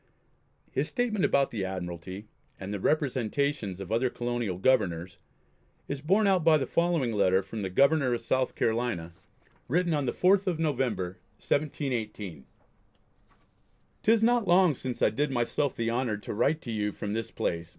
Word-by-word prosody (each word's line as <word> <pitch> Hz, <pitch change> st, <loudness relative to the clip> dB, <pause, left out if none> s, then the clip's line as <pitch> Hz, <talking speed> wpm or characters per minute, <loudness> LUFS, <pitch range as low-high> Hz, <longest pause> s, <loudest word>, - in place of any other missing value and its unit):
His -, -, -1 dB
statement 235 Hz, -6 st, -1 dB
about 140 Hz, -1 st, +2 dB
the 105 Hz, -4 st, -3 dB
Admiralty, 95 Hz, +1 st, -5 dB, 0.3 s
and 100 Hz, +1 st, -5 dB
the 100 Hz, -, -3 dB
representations 135 Hz, -, 0 dB
of 95 Hz, +1 st, -7 dB
other 120 Hz, +3 st, +2 dB
colonial 120 Hz, -6 st, -3 dB
governors, 95 Hz, -6 st, +1 dB, 0.7 s
is 140 Hz, -1 st, -4 dB
borne 195 Hz, +8 st, +3 dB
out 190 Hz, -4 st, +3 dB
by 160 Hz, -1 st, +6 dB
the 135 Hz, -, -1 dB
following 165 Hz, -6 st, +1 dB
letter 95 Hz, -2 st, +3 dB
from 105 Hz, +3 st, -6 dB
the 95 Hz, -, -2 dB
Governor 140 Hz, +6 st, +3 dB
of -, -, -4 dB
South 130 Hz, +2 st, 0 dB
Carolina, 110 Hz, -8 st, -1 dB, 0.5 s
written 175 Hz, +4 st, +1 dB
on 145 Hz, -3 st, 0 dB
the -, -, +1 dB
4th 190 Hz, +2 st, +3 dB
of 175 Hz, -3 st, +1 dB
November, 125 Hz, -, -1 dB, 0.2 s
1718: 110 Hz, -, -3 dB, 1.5 s
"'Tis 225 Hz, 0 st, +3 dB
not 235 Hz, -2 st, +3 dB
long 180 Hz, -2 st, +5 dB
since 130 Hz, -1 st, -4 dB
I -, -, +4 dB
did 150 Hz, +1 st, 0 dB
myself 130 Hz, +2 st, 0 dB
the 115 Hz, 0 st, -1 dB
honour 120 Hz, -3 st, -1 dB
to 105 Hz, -, -6 dB
write 150 Hz, +9 st, +1 dB
to 120 Hz, -, -6 dB
you 105 Hz, -1 st, -1 dB
from 105 Hz, +1 st, -5 dB
this 115 Hz, 0 st, -3 dB
place 85 Hz, -1 st, -2 dB
(S. -, -, -22 dB
120 Hz, 165 wpm, -28 LUFS, 100-150 Hz, 1.5 s, by